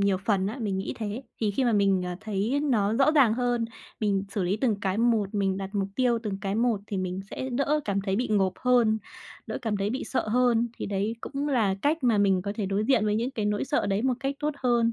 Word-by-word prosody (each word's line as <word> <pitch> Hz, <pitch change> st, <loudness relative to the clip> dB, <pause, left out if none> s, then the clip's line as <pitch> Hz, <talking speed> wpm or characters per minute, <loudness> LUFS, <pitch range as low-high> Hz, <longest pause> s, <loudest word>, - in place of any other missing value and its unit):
nhiều 200 Hz, -1 st, +3 dB
phần 195 Hz, -1 st, 0 dB
á, 220 Hz, +7 st, -4 dB
mình 200 Hz, -4 st, -1 dB
nghĩ 195 Hz, -, -3 dB
thế. 215 Hz, +3 st, -4 dB, 0.2 s
Thì 215 Hz, -, +1 dB
khi 255 Hz, +6 st, 0 dB
mà 235 Hz, -, +3 dB
mình, 195 Hz, -3 st, +3 dB
à, 180 Hz, -, -4 dB
thấy 215 Hz, +6 st, -1 dB
nó 220 Hz, -8 st, +2 dB
rõ 270 Hz, +5 st, +4 dB
ràng 255 Hz, -8 st, +5 dB
hơn, 245 Hz, -1 st, 0 dB, 0.4 s
mình 200 Hz, -2 st, +1 dB
xử 200 Hz, -1 st, -1 dB
lý 185 Hz, +4 st, 0 dB
từng 225 Hz, -3 st, +1 dB
cái 195 Hz, +1 st, -1 dB
một, 225 Hz, -4 st, +2 dB
mình 195 Hz, -2 st, +1 dB
đặt 195 Hz, 0 st, -5 dB
mục 195 Hz, -1 st, 0 dB
tiêu 245 Hz, -2 st, +2 dB
từng 205 Hz, -3 st, -3 dB
cái 195 Hz, 0 st, -2 dB
một 230 Hz, -2 st, +1 dB
thì 205 Hz, -, -4 dB
mình 185 Hz, 0 st, -2 dB
sẽ 260 Hz, -, -4 dB
đỡ 280 Hz, +4 st, +1 dB
cảm 200 Hz, -1 st, 0 dB
thấy 195 Hz, -1 st, -1 dB
bị 245 Hz, +2 st, -1 dB
ngộp 195 Hz, -3 st, +2 dB
hơn, 240 Hz, -3 st, +3 dB, 0.5 s
đỡ -, -, -4 dB
cảm 220 Hz, -3 st, -1 dB
thấy 200 Hz, +1 st, -1 dB
bị 260 Hz, -, -3 dB
sợ 255 Hz, -, -2 dB
hơn. 240 Hz, 0 st, +3 dB
Thì -, -, -4 dB
đấy 205 Hz, +2 st, -1 dB
cũng 285 Hz, +1 st, -3 dB
là 220 Hz, -8 st, +2 dB
cách 295 Hz, -1 st, +1 dB
mà 230 Hz, -4 st, +3 dB
mình 195 Hz, -2 st, +3 dB
có 200 Hz, -, -3 dB
thể 210 Hz, -, -1 dB
đối 200 Hz, +2 st, 0 dB
diện 235 Hz, -4 st, +3 dB
với 210 Hz, -, +1 dB
những 235 Hz, +4 st, 0 dB
cái 220 Hz, -6 st, -3 dB
nỗi 210 Hz, 0 st, 0 dB
sợ 290 Hz, +2 st, 0 dB
đấy 195 Hz, +2 st, 0 dB
một 260 Hz, 0 st, +2 dB
cách 275 Hz, 0 st, -1 dB
tốt 300 Hz, 0 st, 0 dB
hơn. 235 Hz, -3 st, +2 dB
215 Hz, 260 wpm, -27 LUFS, 200-245 Hz, 0.5 s, ràng